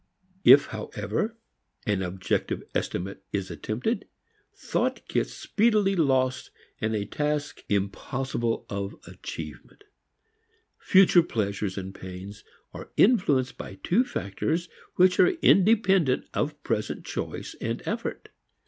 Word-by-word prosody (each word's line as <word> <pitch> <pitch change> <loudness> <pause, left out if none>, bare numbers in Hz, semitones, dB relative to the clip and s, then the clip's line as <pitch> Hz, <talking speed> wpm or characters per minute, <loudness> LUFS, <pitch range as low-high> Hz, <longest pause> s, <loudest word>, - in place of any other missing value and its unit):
If - - +9
however 220 +1 -3 0.5
an 105 -4 +1
objective 95 0 -2
estimate 95 +2 -3
is 95 -2 -2
attempted, 160 - -2 0.5
thought - - -2
gets - - 0
speedily 210 -3 +2
lost 130 -5 +1 0.3
in 110 0 0
a 100 -1 -1
task 150 +5 -2
impossible 115 +4 -1
of 100 0 -4
achievement. 75 -2 -9 1.0
Future 185 -2 +6
pleasures 100 - -2
and 95 0 -5
pains 95 +2 -9 0.3
are - - -9
influenced 150 - +3
by 95 - -7
two 190 - +2
factors 165 - -2 0.3
which 180 0 +4
are - - +8 0.2
independent 195 - +4
of 150 0 -2
present 110 -3 -2
choice - - -5
and - - -3
effort. - - -4
130 Hz, 110 wpm, -27 LUFS, -, 1.0 s, If